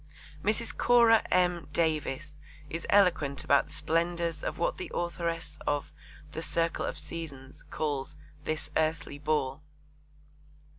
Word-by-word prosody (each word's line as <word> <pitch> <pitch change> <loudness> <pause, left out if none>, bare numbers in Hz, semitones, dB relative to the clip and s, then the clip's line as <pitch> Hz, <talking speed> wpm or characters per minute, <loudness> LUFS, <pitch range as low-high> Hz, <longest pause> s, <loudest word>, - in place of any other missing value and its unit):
Mrs. 220 +3 0
Cora 235 -2 +6
M. 180 -2 +2
Davis 155 -2 0 0.4
is 165 - -4
eloquent 170 -9 +3
about 140 +2 +4
the 150 - -13
splendours 170 -1 0
of - - -2
what 170 - 0
the - - -5
authoress 170 -1 -2
of 145 -1 0 0.4
The 160 - -4
Circle 165 0 0
of - - -3
Seasons 150 -4 -7
calls 145 -3 -2 0.3
'this 155 0 -3
earthly 155 -2 0
ball.' 150 -2 0
160 Hz, 120 wpm, -30 LUFS, 150-170 Hz, 0.4 s, Cora